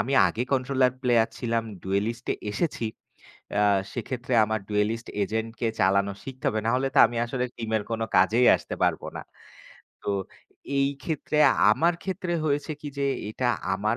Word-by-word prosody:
আমি 135 Hz, -, -3 dB
আগে 115 Hz, -, -2 dB
controller 130 Hz, -1 st, +2 dB
player 120 Hz, -3 st, +3 dB
ছিলাম। 115 Hz, -2 st, 0 dB, 0.2 s
ডুয়েলিস্টে-এ 105 Hz, +5 st, -1 dB
এসেছি। 120 Hz, 0 st, -1 dB, 0.7 s
আ -, -, +4 dB, 0.3 s
সেক্ষেত্রে 125 Hz, +1 st, -5 dB
আমার 110 Hz, 0 st, -2 dB
ডুয়েলিস্ট 105 Hz, +2 st, 0 dB, 0.2 s
এজেন্টকে 110 Hz, +3 st, -2 dB
চালানো 100 Hz, +1 st, +3 dB
শিখতে 130 Hz, -2 st, -9 dB
হবে। 110 Hz, -, -1 dB
নাহলে 130 Hz, +3 st, +1 dB
তো -, -, +4 dB
আমি 120 Hz, +1 st, -7 dB
আসলে 125 Hz, +1 st, -2 dB
টিমের 110 Hz, -2 st, -1 dB
কোনো 115 Hz, 0 st, -1 dB
কাজেই 110 Hz, +7 st, +4 dB
আসতে -, -, -7 dB
পারব -, -, +2 dB, 0.2 s
না। -, -, -5 dB, 0.8 s
তো -, -, -2 dB, 0.7 s
এই 135 Hz, 0 st, +3 dB, 0.2 s
ক্ষেত্রে 155 Hz, -1 st, -2 dB, 0.3 s
আমার 170 Hz, +8 st, +2 dB
ক্ষেত্রে 185 Hz, -2 st, -2 dB
হয়েছে 145 Hz, 0 st, 0 dB
কি 150 Hz, -, -6 dB
যে। 140 Hz, -, +1 dB, 0.3 s
এটা 125 Hz, +3 st, -1 dB, 0.3 s
আমার 105 Hz, +4 st, 0 dB
120 Hz, 150 wpm, -26 LUFS, 110-135 Hz, 0.8 s, আ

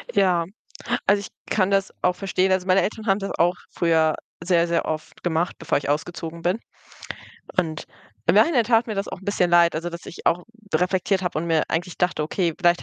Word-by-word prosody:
Ja, 180 Hz, -4 st, +3 dB, 0.6 s
also, 200 Hz, 0 st, +4 dB
ich -, -, -8 dB, 0.3 s
kann 195 Hz, -1 st, +2 dB
das 195 Hz, 0 st, +1 dB
auch 180 Hz, 0 st, +2 dB
verstehen. 190 Hz, -1 st, 0 dB
Also, 185 Hz, 0 st, +1 dB
meine 185 Hz, +1 st, +5 dB
Eltern 220 Hz, +1 st, -3 dB
haben 195 Hz, +1 st, +3 dB
das 195 Hz, -, -4 dB
auch 175 Hz, +2 st, +3 dB
früher 160 Hz, -2 st, +2 dB, 0.3 s
sehr, 170 Hz, -1 st, +3 dB
sehr 170 Hz, 0 st, 0 dB
oft 155 Hz, 0 st, -5 dB
gemacht, 170 Hz, 0 st, 0 dB
bevor 165 Hz, -, 0 dB
ich 145 Hz, -, -4 dB
ausgezogen 165 Hz, +2 st, -3 dB
bin. 180 Hz, +6 st, 0 dB, 1.0 s
Und 155 Hz, -2 st, 0 dB, 0.4 s
im 165 Hz, -, +4 dB
Nachhinein 240 Hz, +2 st, +5 dB
tat 230 Hz, 0 st, +3 dB
mir 215 Hz, -, -3 dB
das 195 Hz, 0 st, -2 dB
auch -, -, -6 dB
'n -, -, -14 dB
bisschen 180 Hz, -3 st, +1 dB
leid, 170 Hz, -1 st, +5 dB
also, 170 Hz, +2 st, -3 dB
dass 170 Hz, 0 st, -9 dB
ich -, -, -10 dB
auch 175 Hz, +1 st, +2 dB, 0.3 s
reflektiert 190 Hz, +1 st, +1 dB
habe 175 Hz, -3 st, -1 dB
und 170 Hz, -, -3 dB
mir 160 Hz, -2 st, +2 dB
eigentlich 175 Hz, +2 st, -2 dB
dachte: 180 Hz, -4 st, +1 dB
„Okay, 165 Hz, +1 st, -1 dB
vielleicht 175 Hz, -1 st, +3 dB
175 Hz, 205 wpm, -23 LUFS, 165-195 Hz, 1.0 s, meine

